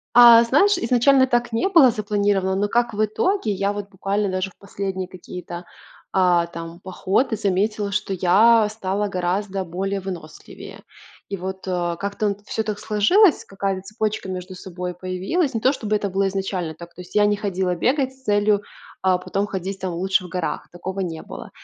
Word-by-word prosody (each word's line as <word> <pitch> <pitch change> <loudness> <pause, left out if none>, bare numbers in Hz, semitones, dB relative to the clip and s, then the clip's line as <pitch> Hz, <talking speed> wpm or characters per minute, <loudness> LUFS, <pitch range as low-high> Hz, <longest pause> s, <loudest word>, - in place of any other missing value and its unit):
А, 235 -1 +9
знаешь, 345 - +3
изначально 260 +3 +4
так 240 -2 0
не 230 +12 +1
было 325 -10 +7
запланировано, 205 -3 0
но 205 +1 0
как 240 0 +1
в 215 +1 +2
итоге, 225 - 0
я 200 +1 0
вот 205 -1 -6
буквально 195 +1 -1
даже 185 +1 -2
в - - -27
последние 190 -2 -4
какие-то, 180 -1 -8 0.5
а, 180 -2 +3
там, 165 +1 -9
походы 195 +6 0
заметила, 200 +1 0
что 200 -1 -1
я 215 +5 +5
стала 205 -1 -2
гораздо 190 +2 -2
более 195 +3 -3
выносливее. 175 -5 -9 0.5
И 195 - -3
вот, 190 0 -6
э, 175 -2 -1
как-то 200 +2 -3
н 200 - -2
всё 220 - -2
так 215 -1 -4
сложилось, 300 - +3
какая-то 195 -1 -3
цепочка 215 -1 -3
между 185 0 -6
собой 180 -1 -6
появилась. 185 - -1
Не 225 - -2
то, 260 +5 +3
чтобы 215 -3 -2
это 205 -1 -2
было 195 +1 0
изначально 190 -4 -3
так, 170 +1 -12
то 180 - -9
есть 180 - -16
я 210 0 +5
не 205 0 +2
ходила 190 -3 -1
бегать 265 - +1
с 265 - -26
целью, 205 -2 +2 0.4
а, 185 -1 +3
потом 195 +2 -2
ходить 190 0 -4
там 185 -1 -3
лучше 185 +2 0
в - - -8
горах. 180 -2 -3
Такого 190 +2 -5
не 165 -4 -3
было. - - -9
195 Hz, 185 wpm, -22 LUFS, 185-215 Hz, 0.5 s, А